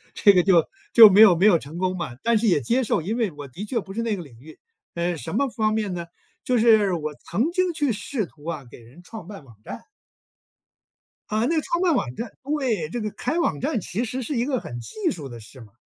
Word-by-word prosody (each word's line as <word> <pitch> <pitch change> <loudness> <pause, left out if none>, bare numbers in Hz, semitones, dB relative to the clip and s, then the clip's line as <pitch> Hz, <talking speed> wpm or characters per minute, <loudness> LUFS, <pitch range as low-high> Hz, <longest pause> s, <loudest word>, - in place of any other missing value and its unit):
这 200 - +6
个 180 -2 +4
就 175 -4 +4 0.3
就 225 -3 +10
没 200 +3 +6
有 200 -6 +8
没 185 - +2
有 180 -6 +5
成 150 +4 -10
功 185 0 -1
嘛， 155 -8 -5
但 230 -1 +3
是 225 +1 0
也 160 -7 +3
接 245 +3 +1
受， 205 - 0
因 210 +8 -3
为 225 -6 0
我 145 -2 -9
的 185 +11 -8
确 230 +2 -2
不 195 - -10
是 230 - -3
那 225 -2 -1
个 180 - -7
领 120 -6 -16
域。 155 +5 -15 0.3
呃， 170 0 -2
什 160 +5 -6
么 275 +1 +1
方 215 -2 0
面 210 -4 -2
呢？ 170 -1 -5 0.4
就 250 - +1
是 220 -4 +4
我 155 -3 -4
曾 225 - -2
经 365 -1 0
去 290 -4 0
试 215 +2 -3
图 150 -3 -19
啊， 160 -5 -5
给 - - -13
人 120 +8 -17
创 200 -2 -10
办 200 -6 -10
网 115 -5 -18
站。 - - -8 1.5
啊， 215 +1 0
那 330 - 0
个 310 - +1
创 340 +1 -2
办 350 -3 +3
网 125 - -2
站 235 - -6
对， 260 - -1
这 235 +9 -4
个 215 -1 -3
开 295 +10 -3
网 160 - 0
站 285 -8 -1
其 205 +6 -3
实 250 +2 -4
是 265 +3 -3
一 235 - +1
个 260 -2 -1
很 120 0 -8
技 355 - -3
术 150 - -7
的 120 -2 -10
事 120 +4 -14
嘛， 105 -3 -15
205 Hz, 270 characters per minute, -23 LUFS, 165-235 Hz, 1.5 s, 就